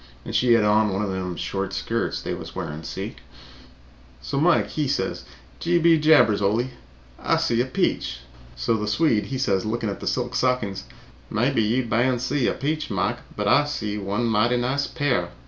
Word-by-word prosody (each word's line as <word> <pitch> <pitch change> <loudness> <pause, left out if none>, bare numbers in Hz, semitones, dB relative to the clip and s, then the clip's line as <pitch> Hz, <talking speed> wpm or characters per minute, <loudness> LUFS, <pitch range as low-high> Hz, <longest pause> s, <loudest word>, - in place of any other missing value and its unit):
And - - -6
she 125 -1 +4
had 115 - +4
on 105 +1 +3
one 95 +2 -1
of 100 - -2
them 90 -1 -3
short 95 +2 -3
skirts 115 +4 -2
they - - -3
was - - -8
wearing, 75 +1 -5
see? 80 - -6 1.0
So 140 - -3
Mike 170 +2 +3
he 150 -2 -1
says 140 - -2 0.3
'Gee 175 +1 +2
be 165 -1 +5
jabbers, 150 -10 +5
Ole, 115 +6 +1 0.5
I - - +1
see 115 0 +1
a 125 - -1
peach.' 60 - -1 0.3
So - - 0
the 105 0 -3
Swede 110 -1 +2
he 135 - -3
says 100 -8 +1
lookin' 110 0 -2
at 100 - -5
the - - -6
silk 125 -1 -1
stockings, 115 -8 0 0.4
'Mebby 120 +3 +1
you 120 +4 +1
ban 120 +3 +2
see 130 +2 0
a - - +1
peach, 155 +2 -2
Mike, 95 -5 -1 0.2
but - - -2
I - - +6
ban 145 - -1
see 105 -7 -3
one 100 +4 -1
mighty 115 +2 +2
nice 130 +4 0
pair.' 145 -5 0
120 Hz, 195 wpm, -24 LUFS, 105-135 Hz, 1.0 s, I